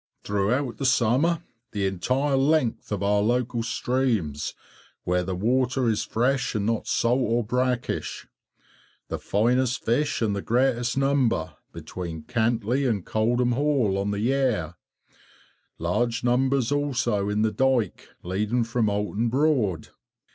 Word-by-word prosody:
Throughout 115 +6 0
the 135 - -3
summer 130 +8 +2 0.3
the 100 -2 -1
entire 130 +10 0
length 135 -4 +1
of 100 -1 -2
our 100 0 +2
local 120 +2 0
streams 115 - -1 0.5
where 90 0 +1
the 95 0 -3
water 125 +5 +1
is 110 -2 +1
fresh 125 +2 0
and 105 -1 0
not 115 0 -1
salt 120 +3 +2
or 120 -1 +1
brackish; 125 +2 -2 0.8
the - - -3
finest 125 +4 +1
fish 145 +6 +1
and 105 -2 +1
greatest 120 0 +1
number 135 - +1 0.2
between 85 -4 -7
Cantley 120 +2 0
and 100 -6 -2
Coldham 120 +3 +1
Hall, 130 -6 +1
on 100 +1 -1
the 100 0 -2
Yare; 125 - 0 1.0
large 115 +8 -1
numbers 130 +1 +2
also 125 -8 0
in 105 +1 +1
the 110 - +2
dyke 130 0 0
leading 105 +7 0
from 115 -1 0
Oulton 105 +3 -1
Broad. 125 - +1
120 Hz, 130 wpm, -25 LUFS, 105-130 Hz, 1.0 s, summer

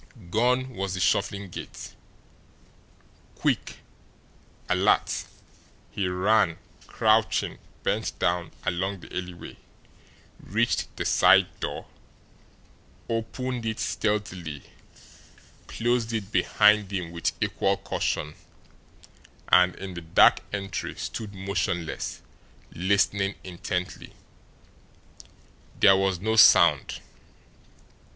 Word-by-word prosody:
Gone 125 +4 +2
was 100 -5 -4
the - - -4
shuffling 100 +1 0
gait. - - -9 1.4
Quick, - - -1 0.9
alert, - - +1 0.7
he 95 - -1
ran, 90 -1 +2 0.3
crouching, - - +1 0.2
bent - - -1
down, 85 0 0 0.2
along 95 +2 -2
the - - -11
alleyway, 90 -1 -7 0.8
reached 115 +5 0
the - - -3
side - - +5
door, - - -4 1.2
opened 120 +2 -3
it 110 -1 -3
stealthily, 95 -8 -2 1.0
closed 120 0 0
it 110 -2 -3
behind 105 -2 +4
him 90 -4 -3
with 85 -1 -1
equal 100 0 0
caution, 75 0 -2 1.2
and, 90 0 +5
in 95 -1 -7
the 85 - -7
dark 80 0 +5
entry, 100 -4 -4
stood 105 -3 -6
motionless, 95 -3 -3 0.5
listening 100 +2 +1
intently. 90 0 -5 1.7
There 95 - +7
was 95 -2 +1
no 110 +4 -1
sound. 110 - +6
95 Hz, 90 wpm, -26 LUFS, 90-110 Hz, 1.7 s, There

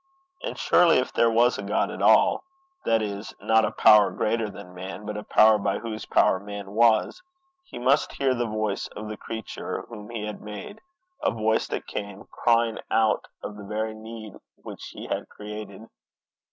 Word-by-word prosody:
And - - -5
surely, 175 -2 +5
if 130 - -1
there 115 - +4
was 120 +2 +3
a - - -2
God 100 +2 0
at - - -6
all, - - +5 0.4
that 115 -1 +2
is, 100 0 -5
not 110 -1 +3
a - - 0
power 105 -2 +6
greater 110 0 -1
than 90 -2 -11
man, 95 +3 -7
but 105 - -4
a 105 - -5
power 110 0 +5
by 100 -1 0
whose 110 -2 -6
power 95 - +3
man 100 0 -8
was, 115 - +3 0.4
he - - -10
must 135 +4 +2
hear 135 -1 +1
the 120 -1 -1
voice 110 -2 -2
of 105 0 -6
the 110 - -4
creature 110 -1 -6
whom 105 -3 -9
he 115 -3 -4
had 105 -1 -6
made, 105 - -8 0.4
a - - +2
voice 110 0 0
that - - -4
came 100 -1 -6
crying 115 -1 +2
out 110 -1 +2 0.2
of 105 - -6
the 105 - -9
very 110 +2 -3
need 110 -1 -9 0.2
which - - -10
he - - -9
had - - -4
created. 105 0 -9
110 Hz, 185 wpm, -25 LUFS, 105-115 Hz, 0.4 s, power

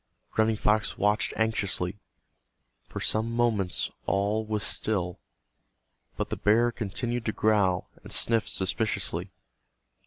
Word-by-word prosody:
Running 110 0 +3
Fox 105 -2 +1
watched 105 +1 +2
anxiously. 100 -4 0 0.9
For - - -6
some 110 +2 +1
moments 115 -6 +1 0.2
all 100 +3 +1
was 105 -1 -1
still, 90 -5 -1 1.0
but - - -3
the - - -1
bear 115 +3 +4
continued 120 +2 -3
to 110 - +1
growl, 100 -5 +2
and - - -11
sniff 115 -2 +1
suspiciously. 100 +3 0
110 Hz, 115 wpm, -28 LUFS, 100-110 Hz, 1.0 s, bear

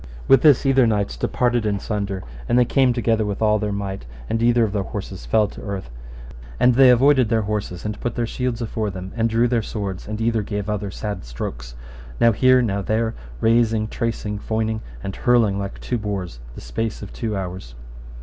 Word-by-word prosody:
With 135 - +6
this 145 -3 +5
either 135 -2 +4
knights 105 -2 0
departed 120 -2 0
in 105 -2 0
sunder, 100 -2 -3 0.3
and 120 - +3
they 125 - +5
came 130 0 +3
together 115 -2 +1
with 100 -1 -3
all 105 -1 +3
their 105 0 -2
might, 100 -8 -4 0.2
and 115 - -1
either 120 0 +4
of 105 -2 -1
their 100 - 0
horses - - -6
fell 105 - +3
to - - -11
the - - -9
earth, 95 -9 -5 0.7
and 125 - +5
they 130 +1 +7
avoided 130 -1 +5
their 110 -1 +2
horses, 100 -4 -4
and 105 0 -4
put 120 - -2
their 120 - 0
shields 125 0 -2
afore 110 -1 -2
them 95 0 -7
and 115 -1 +1
drew 115 +2 +3
their 120 -1 +1
swords, 100 -4 -5
and 105 0 -4
either 115 -1 +1
gave 105 0 -3
other 105 -1 -2
sad 100 0 -5
strokes, - - -6 0.4
now 115 - +6
here, 130 +3 +4
now 100 -3 -1
there, 110 +3 0 0.3
rasing, 115 -1 +3
tracing, 110 -3 -3
foining, 110 +1 -2 0.2
and 95 - -4
hurling 115 -5 +3
like 100 0 -5
two 120 - -2
boars, 95 - -4 0.2
the - - -9
space 110 - -4
of 100 - -9
two 110 -3 -3
hours. 90 -10 -6
110 Hz, 205 wpm, -22 LUFS, 100-115 Hz, 0.7 s, they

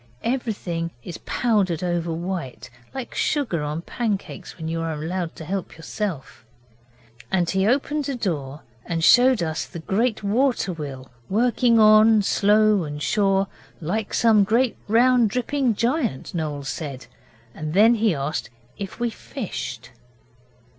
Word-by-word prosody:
Everything 205 -9 -2
is 170 - -7
powdered 195 -8 0
over 175 -1 -1
white, 165 -7 -5 0.2
like 265 -2 -6
sugar 260 - 0
on 150 +3 -3
pancakes 205 -5 -4
when 160 -2 -6
you 165 0 -2
are 165 -1 -2
allowed 165 +3 -4
to 160 - -9
help 190 +1 -4
yourself. 160 - -5 0.9
And 180 -2 +2
he 190 +2 +1
opened 285 +3 0
a 275 - -1
door 150 - -3 0.2
and 165 -1 -3
showed 250 0 +6
us 160 0 -2
the - - -9
great 215 +7 -1
water 230 -1 +1
wheel 140 -5 -7 0.2
working 235 +2 +3
on 215 0 +6
slow 210 0 +3
and 150 -1 -5
sure, 195 +3 +2 0.3
like 200 +6 -2
some 220 -3 +4
great, 230 +5 +2
round, 240 +1 +4
dripping 250 +1 0
giant, 235 - -1
Noel 150 -4 -3
said, 140 -2 -5 0.5
and 155 +2 -5
then 220 +4 +6
he 220 -5 +2
asked 140 +3 -2
us - - -26 0.3
if 195 -2 -6
we 240 -1 0
fished. 130 - -6
195 Hz, 140 wpm, -23 LUFS, 160-230 Hz, 0.9 s, showed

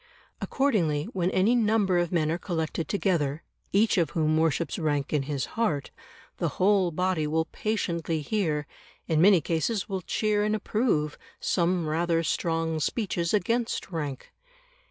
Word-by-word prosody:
Accordingly, 180 - +1
when 180 -1 0
any 190 +5 +3
number 210 -6 +2
of 175 -1 -1
men 160 -3 +1
are 170 - -1
collected 165 -3 -3
together, 165 -7 0 0.3
each 205 0 +3
of 165 - +1
whom 155 -1 +1
worships 160 0 0
rank 145 -3 -1
in 150 - +2
his 140 -4 -1
heart, 160 - -1 0.5
the - - 0
whole 195 -1 +3
body 180 -2 0
will 160 +1 +1
patiently 170 -6 -2
hear 155 -4 -1 0.4
in 160 -1 +2
many 190 -2 +6
cases 175 +7 -1
will 190 -2 -3
cheer 210 +3 0
and 215 +1 +1
approve 210 - 0 0.2
some 175 -2 +1
rather 165 +1 +1
strong 165 -1 -1
speeches 175 -2 -1
against 230 -1 0
rank. 145 -6 -5
170 Hz, 145 wpm, -27 LUFS, 155-205 Hz, 0.5 s, many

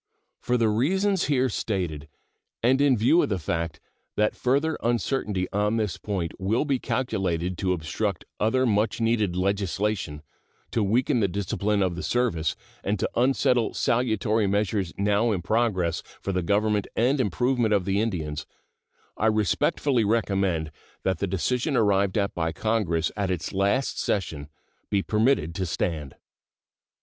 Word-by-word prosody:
For 125 - 0
the 115 -2 +2
reasons 190 - +1
here 130 -3 +2
stated, 90 - -3 0.6
and 130 +3 +4
in 140 -4 +4
view 125 +11 +4
of - - 0
the 100 - 0
fact 85 -1 -3 0.4
that 105 0 +1
further 140 +5 +1
uncertainty 115 -5 0
on 105 +2 +1
this 105 -5 -1
point 95 -4 -3
will 105 +9 +1
be 140 -3 0
calculated 95 -10 -1
to 95 -1 0
obstruct 90 +3 -2
other 130 +5 +2
much 105 -1 +1
needed 115 -5 +1
legislation, 95 -4 -1 0.5
to 115 - +1
weaken 120 +6 +2
the 100 - +3
discipline 100 +2 0
of 90 -2 -1
the 90 - -5
service, 105 -11 0 0.3
and 105 +2 0
to - - 0
unsettle 125 -2 +2
salutary 110 -3 +1
measures 100 -2 0
now 105 +3 +2
in 90 -5 -2
progress 95 -6 +1 0.2
for 100 - -3
the 90 -1 0
government 105 +3 +1
and 130 +4 +2
improvement 120 +2 +1
of 100 -4 +2
the 100 +2 +1
Indians, 80 -9 -3 0.7
I 110 - +2
respectfully 110 +4 +2
recommend 95 -7 0 0.3
that 95 -3 0
the 100 - 0
decision 125 - 0
arrived 100 -2 +2
at 100 -1 0
by 80 -1 -1
Congress 95 -8 0
at 100 -2 -1
its 90 0 -3
last 100 +8 +1
session 75 -7 -2 0.4
be 100 -1 +1
permitted 110 - +1
to 95 +1 -2
stand. 80 -4 -3
105 Hz, 150 wpm, -26 LUFS, 95-115 Hz, 0.7 s, and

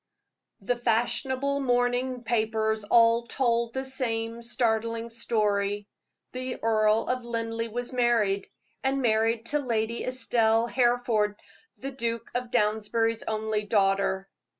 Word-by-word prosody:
The 225 +5 0
fashionable 245 +4 0
morning 245 -1 0
papers 220 -2 0
all 230 +2 +4
told 235 -2 0
the 265 0 -2
same 230 -3 -2
startling 230 -1 -1
story 205 -3 0 0.5
the 255 0 -4
Earl 215 -1 +3
of 255 -1 -1
Linleigh 230 -1 -3
was 245 +3 -5
married, 230 -5 +2 0.4
and 270 0 0
married 225 0 +2
to 295 - +3
Lady 230 -3 -1
Estelle 230 -3 +2
Hereford, 240 -4 +1 0.4
the 275 - -5
Duke 230 -3 -3
of 245 0 -2
Downsbury's 225 0 +1
only 220 -1 -1
daughter. 195 -2 +1
230 Hz, 115 wpm, -27 LUFS, 220-245 Hz, 0.5 s, all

